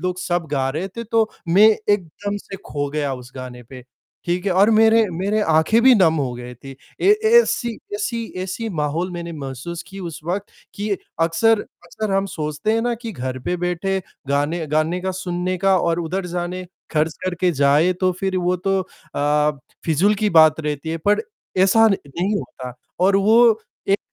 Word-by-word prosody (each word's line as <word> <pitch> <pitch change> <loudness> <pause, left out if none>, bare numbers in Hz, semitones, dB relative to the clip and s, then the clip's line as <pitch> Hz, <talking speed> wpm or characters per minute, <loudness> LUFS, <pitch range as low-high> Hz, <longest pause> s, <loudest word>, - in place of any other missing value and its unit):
लोग 180 0 -2
सब 175 -2 -1
गा 135 -2 0
रहे 160 +7 -3
थे, 230 +5 -7
तो 225 0 +1 0.2
मैं 200 +6 +7 0.2
एकदम 205 +1 -1
से 195 -1 -8
खो 145 -1 -3
गया 145 -2 -1
उस 125 0 -11
गाने 125 -1 -8
पे। 125 +1 -12 0.4
ठीक 175 +1 -1
है 190 - +2
और 195 +4 +4
मेरे 225 +1 +5
मेरे 195 +5 -1
आँखें 160 +9 +4
भी 260 0 +7
नम 180 -7 +4
हो 135 -4 -1
गई 125 0 -8
थी। 135 +2 -11 0.2
ए 380 - +3 0.3
ऐसी 240 - -1 0.2
ऐसी 245 - -2 0.2
ऐसी 195 +5 -4
माहौल 160 +5 -1
मैंने 170 -1 -6
महसूस 145 +6 -6
की 195 0 -9
उस 170 -4 -6
वक़्त 190 +4 -2 0.3
कि 205 +1 -4 0.3
अक्सर 205 +7 +3 0.2
अक्सर 205 +4 -4
हम 195 0 +1
सोचते 155 +6 -2
हैं 225 - +1
ना 240 0 0
कि 230 -1 -7
घर 130 -5 -4
पे 180 - 0
बैठे 180 +2 -1 0.3
गाने, 145 +4 0
गाने 155 +4 0
का 190 +1 -2
सुनने 185 0 -2
का 195 +1 +3
और 170 0 0
उधर 180 +3 -3
जाने 180 +1 -4 0.3
खर्च 155 0 0
करके 180 0 0
जाए 145 +5 +3
तो 185 -1 +2
फिर 190 -1 -1
वो 180 +1 +1
तो 195 0 +2 0.3
अ, 150 0 +1 0.3
फिजूल 175 +6 +3
की 210 0 0
बात 160 -1 +6
रहती 150 0 -4
है 165 - -2
पर 210 +1 +3 0.4
ऐसा 225 +4 +5
नहीं 185 +2 -2
होता 130 -9 -7 0.3
और 195 +1 +4
वो 225 +2 +5 0.3
एक 195 - +3
180 Hz, 185 wpm, -21 LUFS, 155-200 Hz, 0.4 s, मैं